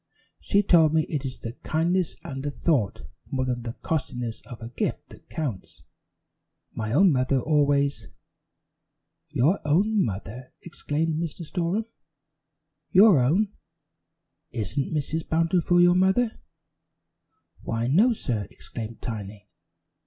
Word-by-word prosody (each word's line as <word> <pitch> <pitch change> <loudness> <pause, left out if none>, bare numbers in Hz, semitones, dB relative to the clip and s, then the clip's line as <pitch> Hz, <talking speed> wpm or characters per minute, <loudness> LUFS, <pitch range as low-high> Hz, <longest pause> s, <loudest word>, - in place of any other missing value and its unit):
"She 200 +1 +2
told 160 -5 +5
me 160 - +4
it 145 -3 -2
is 130 -1 -5
the 115 - -5
kindness 170 +2 0
and 135 -5 -6
the 145 - -2
thought 140 - 0 0.3
more 130 -1 -1
than 125 -1 -2
the 115 -1 -5
costliness 125 -7 -3
of 120 -2 -9
a 115 - -7
gift 120 - -3
that - - -16
counts. 130 -12 -5 0.9
My 110 -1 -3
own 180 +8 +5
mother 130 0 +2
always 140 -1 +1 0.6
" - - -55
"Your 155 +11 +3
own 195 +8 +2
mother!" 110 +5 -6
exclaimed 160 -1 -2
Mr. 170 0 -5
Storem. 180 +6 -1 1.0
"Your 195 -4 +7
own! 185 +11 +2 1.0
Isn't 115 +6 -2
Mrs. 155 +1 -2
Bountiful 165 +2 +2
your 175 0 +6
mother?" 190 +6 +2 1.2
"Why, 115 0 -2
no, 190 - +4
sir," 120 - -2
exclaimed 115 -1 -8
Tiny. 105 -2 -6
150 Hz, 125 wpm, -25 LUFS, 120-175 Hz, 1.2 s, Your